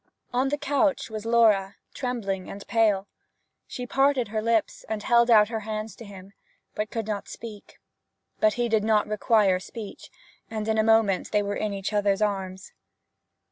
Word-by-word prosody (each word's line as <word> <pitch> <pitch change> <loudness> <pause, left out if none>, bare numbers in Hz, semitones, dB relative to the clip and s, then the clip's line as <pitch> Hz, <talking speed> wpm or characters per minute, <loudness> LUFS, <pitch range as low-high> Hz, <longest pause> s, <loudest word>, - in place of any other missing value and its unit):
On 255 +2 +1
the 290 - -1
couch 290 -3 0
was 215 0 -5
Laura, 210 -4 +3 0.2
trembling 210 -7 -3
and 200 - -8
pale. 210 -4 +2 0.6
She 250 - -6
parted 270 -2 +2
her 215 0 -2
lips 230 -1 0
and 215 -1 -3
held 235 +1 +4
out 215 -2 +6
her 225 -1 -2
hands 215 0 -5
to 230 - -10
him, 195 -1 -12 0.4
but 210 0 -3
could 225 -2 -3
not 205 -2 -4
speak. 215 -3 -10 0.6
But 215 -1 +4
he 240 +1 0
did 220 -2 +1
not 215 -1 +3
require 210 -3 +2
speech, 210 +2 -9 0.4
and 215 -1 -4
in 220 0 +1
a - - +4
moment 220 -4 +3
they 210 - +2
were 200 0 -2
in 215 -1 -2
each 195 +1 -4
other's 205 -1 +2
arms. 190 -3 -3
215 Hz, 175 wpm, -26 LUFS, 200-230 Hz, 0.6 s, out